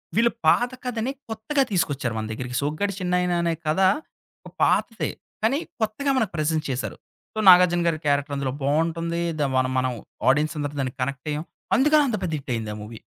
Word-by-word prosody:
వీళ్ళు 230 +2 +4 0.2
పాత 245 +1 +4
కథని 245 +1 -1 0.2
కొత్తగా 225 +6 0
తీసుకొచ్చారు 140 - 0
మన 110 - -2
దగ్గరికి. 125 +2 -5
'సోగ్గాడే 155 +8 -1
చిన్నాయిన' 180 -1 +1
అనే 170 -1 +1
కథ, 155 +4 +1 0.7
ఒక - - -12
పాతదే. 225 - +1 0.3
కానీ 270 +7 +3 0.2
కొత్తగా 220 +6 0
మనకు 220 -7 +1
ప్రెజెంట్ 155 +1 0
చేశారు. 130 0 -3 0.4
సో 220 - -3
'నాగార్జున' 175 -1 +6
గారి 155 -2 +1
క్యారెక్టర్ 145 0 +1
అందులో 135 -2 -2
బావుంటుంది. 165 +3 0 0.2
దా 145 - +2
మన 130 0 +3
మనం 130 0 0 0.4
ఆడియన్స్ 155 +3 0
అందరం 145 0 -3
దానికి 130 0 -4
కనెక్టయ్యాం. 145 +4 -3 0.3
అందుకని 300 +3 +5
అంత 215 - 0
పెద్ద 165 - -2
హిట్ 135 -2 -7
అయింది 110 -2 -4
ఆ - - -8
మూవీ. 110 +1 -9
160 Hz, 175 wpm, -24 LUFS, 140-215 Hz, 0.7 s, నాగార్జున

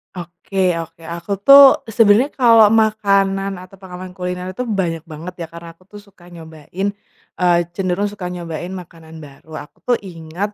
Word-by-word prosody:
Oke 180 +1 -2
oke 165 0 -8
aku 170 +4 -8
tuh 275 +2 +8
sebenernya 225 +5 +4
kalau 230 -4 +6
makanan 200 -3 +1
atau 185 +2 -14
pengalaman 185 0 -10
kuliner 180 0 -5
itu 225 - -5
banyak 190 -9 -2
banget 160 +4 -8
ya 165 - -5
karena 170 0 -11
aku 185 +3 -29
tuh 210 - -12
suka 195 -4 -18
nyobain, 165 +4 -6 0.5
eee, 175 -1 +3
cenderung 185 +2 -2
suka 200 -3 -6
nyobain 175 -1 -6
makanan 165 -2 -13
baru 155 +1 -12
aku - - -30
tuh 245 -1 0
ingat, 175 +3 -6
180 Hz, 160 wpm, -18 LUFS, 170-200 Hz, 0.5 s, tuh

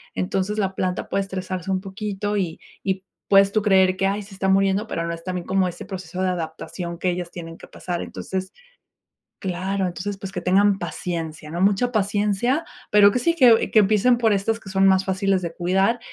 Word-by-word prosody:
Entonces, 190 +3 -1
la 195 -2 -1
planta 185 -1 -2
puede 195 - 0
estresarse 185 -1 -4
un 185 0 0
poquito 205 +1 -3
y 175 -4 -2 0.2
y 190 -1 -1 0.2
puedes 195 0 +5
tú 215 +1 +1
creer 190 -2 +4
que, 195 - +2
ay, 200 +2 -1
se 195 0 -12
está 190 0 -2
muriendo, 195 +2 +2
pero 170 - -3
no 170 - -2
es 165 0 -8
también 180 -1 -4
como 190 -1 +2
ese 175 - -7
proceso 185 -2 -6
de 185 - +1
adaptación 170 0 -5
que 185 - 0
ellas 175 -1 -3
tienen 165 -1 -8
que - - -13
pasar 175 -1 -5
entonces, 190 0 -5 0.9
claro, 190 +1 -2
entonces 195 +3 -4
pues 195 -1 -6
que - - -4
tengan 195 +2 +3
paciencia, 160 -5 -5
¿no?, 170 +3 -3
mucha 205 +5 +2
paciencia, 210 +6 +1 0.3
pero 205 -1 +7
que - - 0
sí 335 +7 +2
que 245 -6 +5
que 220 - +6
empiecen 215 +4 +4
por 225 -3 +3
estas 225 +3 0
que 195 - -11
son 190 0 +3
más 190 0 +4
fáciles 190 0 +1
de 170 -2 -4
cuidar 195 +6 +1
190 Hz, 205 wpm, -23 LUFS, 180-205 Hz, 0.9 s, pero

